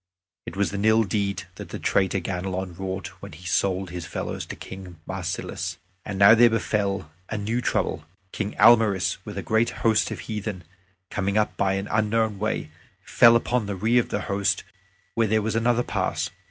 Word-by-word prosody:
It - - -6
was 100 0 0
an 100 0 -2
ill 110 +1 +5
deed 100 -1 -1
that - - -8
the - - -5
traitor 95 0 +1
Ganelon 95 0 -3
wrought 95 0 -4
when 100 -3 -9
he 85 +4 -13
sold 95 +3 0
his 90 -2 -6
fellows - - -4
to - - -6
King 95 -3 -10
Marsilas! 95 -2 -4 0.3
And 100 -2 -5
now 100 +2 +8
there 120 +1 +7
befell 100 -6 -1 0.2
a 110 - -2
new 110 +4 -1
trouble. 75 - -1 0.3
King 105 0 -3
Almaris, 110 -5 +5
with - - -7
a - - -3
great 110 +1 +2 0.2
host 110 -2 +3
of 105 -6 -5
heathen, 105 0 -5 0.5
coming 100 +1 0 0.2
by 95 -1 +1
an 95 +1 -2
unknown 110 -1 +1
way, 105 -7 -2 0.3
fell 115 -1 +6
upon 115 -1 +1
the 100 - -3
rear 115 +6 +3
of - - -9
the - - -2
host 100 -1 0 0.5
where 115 +1 +2
there 110 +1 +2
was 110 0 -1
another 120 +1 +2
pass. - - -2
100 Hz, 180 wpm, -25 LUFS, 95-110 Hz, 0.5 s, now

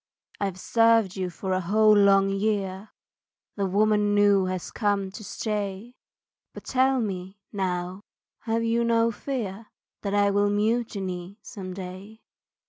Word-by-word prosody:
I've 195 -2 -2
served 225 -4 +3
you 185 -2 -2
for 190 +2 -4
a 185 - +1
whole 215 +4 +4
long 195 -1 +5
year 195 -1 -2 0.7
The 200 -2 -1
woman 210 +1 +2
new 205 -2 +4
has 185 -1 -4
come 200 -3 0
to 215 +2 -9
stay 210 +2 -4 0.6
But - - -9
tell 265 0 +2
me, 190 -3 -4 0.2
now, 185 -1 -2 0.4
have 230 0 -1
you 230 +1 +1
no 230 0 +2
fear 225 -4 -5 0.3
That 200 -1 -2
I 205 0 +3
will 205 0 +2
mutiny 205 -4 -2
some 185 -6 -8
day. 190 +4 -9
205 Hz, 135 wpm, -26 LUFS, 190-220 Hz, 0.7 s, long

